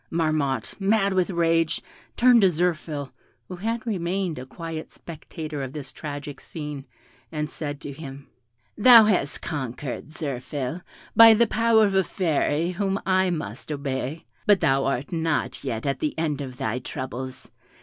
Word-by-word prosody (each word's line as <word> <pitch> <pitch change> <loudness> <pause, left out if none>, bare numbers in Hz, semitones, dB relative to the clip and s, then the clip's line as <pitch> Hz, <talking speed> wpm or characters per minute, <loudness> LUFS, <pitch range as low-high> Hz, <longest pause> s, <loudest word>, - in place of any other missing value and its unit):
Marmotte, 155 -5 0
mad 200 0 +2
with 185 0 +2
rage, 165 -2 +2 0.4
turned 245 -1 +6
to 190 - +6
Zirphil, 155 -4 -1 0.4
who 180 - -7
had 225 +4 -2
remained 185 - -1
a 130 - -8
quiet 165 +2 -6
spectator 155 -2 -7
of 135 0 -5
this 140 -3 -6
tragic 145 -2 -7
scene, 150 -3 -7 0.4
and 150 -1 -2
said 145 -2 -5
to 145 - -6
him, 140 -1 -9 0.5
"Thou 230 0 +9
hast 185 -9 0
conquered, 130 -1 -4
Zirphil, 145 0 -4 0.3
by 225 -1 +10
the 235 +2 +5
power 225 0 +4
of 200 - 0
a 190 0 +4
fairy 165 -1 0
whom 195 +1 -1
I 185 -1 +3
must 150 - -4
obey; 140 +1 -3 0.2
but 205 -2 +6
thou 135 0 +2
art 135 +4 -1
not 160 -3 -1
yet 115 -3 -3
at 140 -1 -1
the 155 - -2
end 155 -3 -1
of 130 -3 -7
thy 110 +3 -2
troubles. 130 0 -6
155 Hz, 155 wpm, -25 LUFS, 140-185 Hz, 0.5 s, by